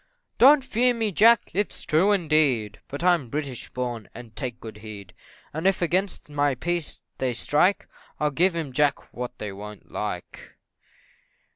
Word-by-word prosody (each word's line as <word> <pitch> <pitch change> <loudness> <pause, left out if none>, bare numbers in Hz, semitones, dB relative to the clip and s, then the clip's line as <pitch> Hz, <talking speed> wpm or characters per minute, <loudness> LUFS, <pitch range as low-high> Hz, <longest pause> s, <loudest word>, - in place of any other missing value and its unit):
"Don't 275 +3 +7
fear 245 +2 +2
me, 225 -2 0
Jack 225 +4 +5
it's 205 +2 -1
true, 165 +7 +3
indeed, 150 - +1
but 145 +4 -6
I'm 175 -8 +3
British 140 -2 -4
born, 120 -4 -4
and 115 -3 -11
take 125 -4 -5
good 110 -2 -9
heed; 105 -3 -10 0.4
And 160 +5 0
if 195 - +2
against 180 +2 0
my 145 -2 +1
peace 175 +3 -3 0.2
they 125 -2 -1
strike, 165 - +2 0.3
I'll 150 -1 +1
give 175 +5 +2
'em, 155 -6 -4
Jack, 145 +2 0
what 125 0 -6
they 105 -2 -5
wo'n't 105 +1 -10
like." - - -6
150 Hz, 155 wpm, -25 LUFS, 120-180 Hz, 0.4 s, Don't